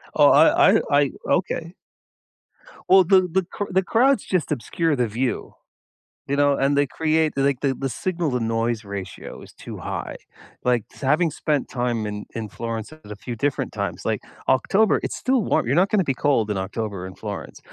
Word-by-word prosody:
Oh, - - +6
I - - +6
I - - +4
I 145 -1 +3 0.2
okay. 170 -2 -1 1.2
Well, 190 0 +7
the 190 +1 +5
the 180 - -3
the - - -11
cr - - -3
the 190 +1 +2
crowds 250 +5 +3
just 180 -5 -1
obscure 150 +4 0
the 125 -3 0
view, 120 +4 -3 0.7
you 140 - -1
know, 145 -1 +4
and 140 +1 +1
they 145 0 +3
create 160 +2 +1
like, 135 -1 +1
the 135 -2 0
the 135 +1 -3
signal 170 +1 -2
to 125 - 0
noise 115 -1 -1
ratio 100 -2 -7
is - - -13
too - - -9
high, - - -5 0.5
like, 125 -3 +1
s - - -16
having 150 +5 +2
spent 150 -2 -1
time 120 -3 -1
in 105 0 -5
in 115 -1 -4
Florence 115 +4 -5
at 155 -9 -14
a - - -5
few 120 +3 -6
different 145 +4 -2
times, - - -4
like, - - -1 0.3
October, 195 - +3
it's - - -3
still 255 -2 +1
warm, - - +1
you're 130 +4 +1
not 185 +4 +4
gonna 200 -4 +2
be 135 - +1
cold 130 -5 +1
in 105 - -1
October 100 0 -4
in 95 - -8
Florence, 105 -2 -7
135 Hz, 195 wpm, -23 LUFS, 115-165 Hz, 1.2 s, Well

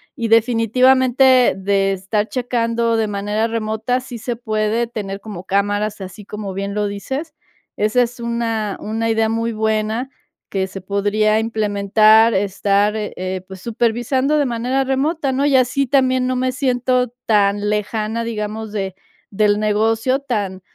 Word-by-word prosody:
Y 230 - -2
definitivamente, 250 +3 +4
de 195 0 +1
estar 200 +3 -1
checando 230 -2 0
de 220 -1 +1
manera 205 +2 -1
remota, 225 +2 -2
sí 250 -1 -8
se 235 +2 -4
puede 220 0 -1
tener 205 -4 -6
como 195 -5 -8
cámaras, 205 +2 0
así 190 +2 -9
como 205 -2 -6
bien 200 +1 -4
lo 210 0 0
dices. 265 - -5 0.4
Esa 215 +4 +2
es 245 +1 -6
una 230 -3 -2
una 225 +1 -2
idea 225 0 +1
muy 230 +1 -1
buena 220 +3 -1 0.4
que 190 -1 -1
se 190 0 -8
podría 205 +3 +1
implementar, 215 0 +3
estar, 200 +1 +1
eh, 185 -3 -4
pues, 190 -1 -10
supervisando 240 +6 0
de 290 - +2
manera 250 +3 0
remota, 275 +3 0
¿no? 270 +2 0
Y 285 -2 +3
así 260 +2 +2
también 260 -1 +2
no 255 0 0
me 255 0 0
siento 250 -1 0
tan 205 -1 +2
lejana, 215 +2 -2
digamos, 220 -1 -4
de 195 -3 -3 0.3
del 205 0 +2
negocio 225 +4 +1
tan 205 -9 -3
220 Hz, 150 wpm, -19 LUFS, 205-245 Hz, 0.4 s, definitivamente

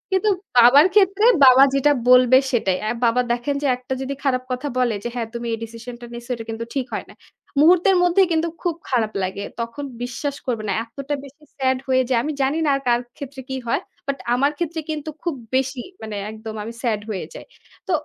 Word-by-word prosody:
কিন্তু 425 +3 +2 0.3
বাবার 255 +7 +8
ক্ষেত্রে 400 +1 +4 0.2
বাবা 260 +1 +8
যেটা 275 +2 +3 0.2
বলবে 250 0 +7
সেটাই। 195 -7 +1
অ্যাঁ 215 +2 -1
বাবা 235 +2 +3
দেখেন 245 +4 -1
যে, 285 - +2
একটা 255 +1 -5
যদি 265 +1 -3
খারাপ 255 -3 +1
কথা 255 +3 -2
বলে 245 -3 +2
যে, - - -2
"হ্যাঁ 235 -2 -2
তুমি 235 0 -5
এই - - -1
ডিসিশনটা 235 +2 -9
নিছ 235 0 -8
এটা 230 -2 -6
কিন্তু 225 +1 -4
ঠিক 265 -3 0
হয় - - -3
না।" - - -13 0.5
মুহূর্তের 360 +5 +5
মধ্যেই 360 +2 +4
কিন্তু 325 +1 +1
খুব 345 -2 -1
খারাপ 230 -4 +1
লাগে। 190 +2 -3 0.2
তখন 230 +5 -5 0.2
বিশ্বাস 275 +3 -3
করবে 230 -4 -1
না - - +1
এতটা 275 +5 -5
বেশি 280 +3 -16
স্যাড 260 -1 +1
হয়ে 260 0 +3
যাই। 235 -2 +3 0.2
জানি 270 +3 +1
না - - +2
আর 275 - -3
কার 240 0 +4 0.2
ক্ষেত্রে 280 -2 -8
কি 265 - -3
হয়। - - +1 0.3
বাট 275 0 -1 0.2
আমার 275 +4 +2
ক্ষেত্রে 335 0 -3
কিন্তু 310 0 -4
খুব 340 -5 -1 0.2
বেশি 260 -1 0 0.2
মানে 220 -1 -6 0.2
একদম 220 0 -8
আমি 230 +2 -7
স্যাড 220 -4 0
হয়ে 190 -6 -3
যাই। - - -10 0.4
তো - - -2
255 Hz, 205 wpm, -22 LUFS, 235-290 Hz, 0.5 s, বাবার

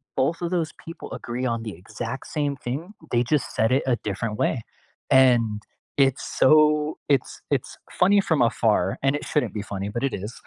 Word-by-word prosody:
both 160 +6 +1
of 170 0 -2
those 165 -4 0
people 165 - -9
agree 125 +2 -4
on 115 -1 -4
the 110 -3 -5
exact 120 +6 -6
same 145 -2 -1
thing, 125 +5 -2 0.3
they 120 0 +3
just 150 - +2
said 110 - +2
it - - -2
a 120 -2 +2
different 105 +2 -2
way. - - +1 0.5
And, 120 -5 +4 0.4
it's 135 -1 +3 0.2
so 150 +1 +4
it's 140 -3 0
it's - - -1 0.2
funny 200 +2 +5
from 160 -7 +1
afar, 110 -5 +2
and 135 0 +3
it 145 - -4
shouldn't 150 - 0
be 105 - -3
funny, 100 0 -3
but 120 +4 -4
it - - -6
is, 105 +5 -5
130 Hz, 190 wpm, -24 LUFS, 115-150 Hz, 0.5 s, funny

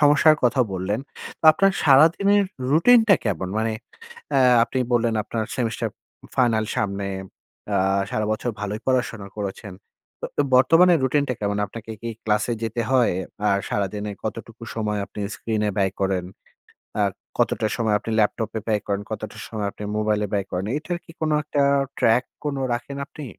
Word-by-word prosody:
সমস্যার 150 +1 +6
কথা 125 +2 +3
বললেন। 95 +4 -2 0.4
তো - - -10
আপনার 195 +5 +3
সারাদিনের 170 +8 +5 0.3
রুটিন 230 - +6
টা 200 - +8
কেমন? 95 -3 -1
মানে 110 0 0 0.6
অ্যা 135 - +4 0.2
আপনি 130 - -3
বললেন 115 -1 +2
আপনার 110 -1 -3
সেমিস্টার 115 -3 -1 0.4
উম - - -14
ফাইনাল 115 -4 +3
সামনে। 100 -1 -1 0.6
অ্যা - - +1 0.3
সারা 110 - -1
বছর 110 +3 -2
ভালোই 105 +1 -3
পড়াশোনা 120 -5 0
করেছেন। 100 0 -5 0.5
তো - - -5 0.2
অ - - +5
বর্তমানের 165 +5 +6
রুটিনটা 140 0 +1
কেমন? 105 0 -1
আপনাকে 115 +2 -10
কি 115 - -3
ক্লাসে 105 +2 +1
যেতে 115 +1 -2
হয়? 125 -6 +4 0.4
আর 100 - +3
সারাদিনে 105 +1 -2
কতটুকু - - -6
সময় 105 -2 -1
আপনি - - -9
স্ক্রিন 110 -2 -2
এ - - +1
ব্যয় 95 -1 +2
করেন? 95 -2 0 0.8
আর 100 -1 +2 0.3
কতটা 110 - +1
সময় 110 -3 +1
আপনি 115 - -5
ল্যাপটপে 110 +1 0
ব্যয় 105 -2 +1
করেন? 100 0 -1
কতটা 110 0 -5
সময় 105 -2 -3
আপনি 105 - -10
মোবাইলে 105 -1 +1
ব্যয় 100 -2 0
করেন? 90 +1 -2
এটার 170 +3 -3
কি 165 - -13
কোন 155 - +1
একটা 145 -1 0 0.4
track 115 +3 +3 0.2
কোন 145 -2 -1 0.2
রাখেন 130 +4 -5
আপনি? 150 - -9
115 Hz, 165 wpm, -23 LUFS, 105-140 Hz, 0.8 s, টা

